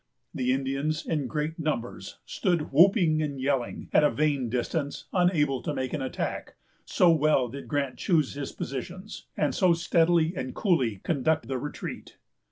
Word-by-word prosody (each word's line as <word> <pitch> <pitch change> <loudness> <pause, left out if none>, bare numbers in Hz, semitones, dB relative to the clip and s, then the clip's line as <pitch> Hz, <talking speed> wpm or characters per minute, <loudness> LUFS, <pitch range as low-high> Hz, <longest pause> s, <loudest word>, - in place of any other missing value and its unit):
The 125 0 0
Indians, 135 +4 -1
in 150 -5 -1
great 155 +3 -3
numbers, 150 -7 -3
stood 175 -4 -1
whooping 165 0 +5
and 145 -3 -3
yelling, 130 -2 -1
at - - +5
a 150 - +5
vain 145 -5 0
distance, 140 +5 -2
unable 155 -8 +2
to 150 - -3
make 130 -1 -3
an 150 - -2
attack, 130 - -4 0.3
so 175 -2 +4
well 150 -5 +3
did 140 +3 -8
Grant 140 -3 -2
choose 160 -8 +1
his 140 -1 -5
positions, 180 +10 -7
and - - +1
so 185 -3 +4
steadily 165 0 +2
and 130 -3 -5
coolly 130 - +1
conduct 155 -4 0
the 130 -1 -2
retreat. 145 +3 -7
150 Hz, 160 wpm, -27 LUFS, 135-165 Hz, 0.3 s, whooping